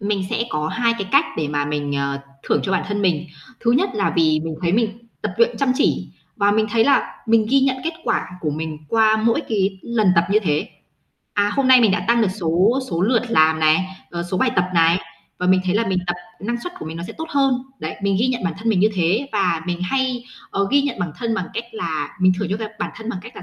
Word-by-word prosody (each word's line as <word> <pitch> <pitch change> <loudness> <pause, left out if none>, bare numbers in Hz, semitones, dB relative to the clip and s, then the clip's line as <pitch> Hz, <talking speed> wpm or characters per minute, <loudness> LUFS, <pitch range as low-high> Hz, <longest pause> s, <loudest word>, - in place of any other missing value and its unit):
Mình 200 -1 -1
sẽ - - 0
có 155 0 -1
hai 235 +4 +1
cái 195 - -4
cách 285 +3 +6
để 155 -2 -1
mà 145 -1 -1
mình, 145 -1 -2
ờ, 140 0 -2 0.2
thưởng - - +1
cho 190 - -2
bản - - +1
thân 205 0 -1
mình. 170 -4 +1 0.4
Thứ 235 - +2
nhất 260 - +3
là 200 - 0
vì 155 -2 +3
mình 160 - -4
thấy 170 - +1
mình 230 +1 -1
tập - - -2
luyện 465 +1 +3
chăm 275 -2 +2
chỉ, - - +1 0.3
và 205 -1 +3
mình 215 +1 +2
thấy 225 0 +3
là 280 - +2
mình 220 -1 +3
ghi 275 0 +5
nhận 265 -1 +2
kết 330 - -1
quả - - 0
của 155 - -1
mình 155 0 -4
qua 220 +1 +4
mỗi 230 +1 +2
cái 195 -3 0
lần 220 -4 +1
tập 170 -1 +4
như 210 - +5
thế. 150 -6 -1 0.7
À, 205 0 +2
hôm 275 -2 +1
nay 260 -1 +8
mình 220 -4 +5
đã 205 - 0
tăng 235 0 +4
được 205 - +2
số 190 +6 +1
số 170 +1 0
lượt 230 +3 +3
làm 160 -5 +3
này, 155 +4 +4 0.3
ờ, 170 0 -3
số 175 +2 -3
bài 260 - +2
tập 180 - +4
này 165 +1 +4 0.4
và 180 - -1
mình 185 0 +4
thấy 185 +1 0
là 230 +2 +1
mình 190 -1 0
tập 175 - 0 0.3
năng 235 +4 -3
suất 360 - -6
của - - -7
mình 160 +1 -6
nó 170 - -5
sẽ - - -8
tốt 320 - -4
hơn. 275 -2 +3 0.3
Đấy, 155 - -4
mình 195 -1 +1
ghi 240 - +3
nhận 245 -5 -2
bản 170 - 0
thân 225 +3 -3
mình 205 -5 +3
như 210 - +5
thế, 190 +9 +1
và 180 -6 +1
mình 175 0 -2
hay, 255 +4 -1 0.3
ờ, 200 0 0
ghi 280 0 +4
nhận 280 -7 -2
bản 175 -4 -3
thân 230 -2 -1
bằng 185 -4 -2
cách 230 - -3
là 160 -9 -4
mình 185 0 +5
thưởng 205 -4 -2
cho, 200 - 0
cái 220 -1 -4
bản - - -3
thân 225 0 -8
bằng 195 - -4
cách 230 +4 -12
là - - -8
200 Hz, 265 wpm, -21 LUFS, 170-230 Hz, 0.7 s, nay